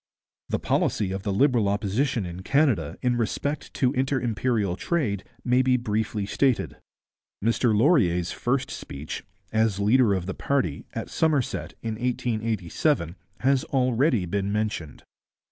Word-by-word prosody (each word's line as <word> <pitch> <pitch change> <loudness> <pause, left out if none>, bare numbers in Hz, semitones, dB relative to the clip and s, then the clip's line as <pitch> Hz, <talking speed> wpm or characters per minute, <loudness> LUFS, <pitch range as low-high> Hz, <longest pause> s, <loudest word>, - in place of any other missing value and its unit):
The - - +1
policy 100 -3 0
of 95 0 -3
the 100 - -2
Liberal 115 -1 +3
Opposition 105 +3 0
in 90 +1 -6
Canada 120 - +1
in 125 -1 +2
respect 140 +5 -2
to 130 0 +2
inter 135 0 +1
imperial 110 -5 0
trade 105 - -1 0.2
may 125 +1 +4
be 130 0 +3
briefly 110 -2 -1
stated. 130 +4 0 0.7
Mr 115 -1 +2
Laurier's 100 - +3
first 130 +2 -1
speech, 70 +3 -6 0.3
as 110 -3 +2
leader 105 0 +4
of 90 -2 -3
the 95 - -3
party, 95 - -1
at - - -5
Somerset, 150 -6 0
in 110 -1 -3
1887, 115 - -1 0.3
has 135 0 +3
already 130 - +2
been 100 +3 -1
mentioned. 105 -8 -3
115 Hz, 135 wpm, -25 LUFS, 100-130 Hz, 0.7 s, may